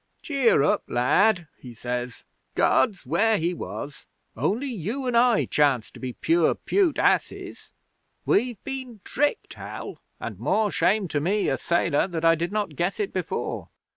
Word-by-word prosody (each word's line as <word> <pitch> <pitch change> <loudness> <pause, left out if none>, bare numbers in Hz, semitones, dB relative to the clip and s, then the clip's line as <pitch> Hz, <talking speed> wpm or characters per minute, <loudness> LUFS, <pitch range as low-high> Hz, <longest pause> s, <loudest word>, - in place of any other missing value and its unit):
'"Cheer 270 - +3
up, 150 - +2
lad," 175 - +2
he 125 -2 -11
says. 125 +1 -4 0.3
"God's 200 - +2
where 205 - +2
He 170 +1 0
was. 145 -4 -7 0.3
Only 235 +8 0
you 235 - -4
and 250 -1 0
I 235 -1 +4
chance 140 -6 +1
to - - -13
be 130 -1 -5
pure 335 - +2
pute 375 -7 +1
asses. - - 0 0.6
We've 240 0 +2
been 260 -6 -6
tricked, 295 - -1
Hal, - - -8 0.2
and - - -6
more 215 -2 +1
shame 200 0 +2
to 150 - 0
me, 195 +7 +1
a - - 0
sailor, 170 -2 +1
that 165 -3 -3
I 165 - +7
did 170 +2 -2
not 205 -7 -2
guess 175 +8 -1
it 205 -2 -2
before! 185 -3 -3
195 Hz, 160 wpm, -25 LUFS, 150-235 Hz, 0.6 s, I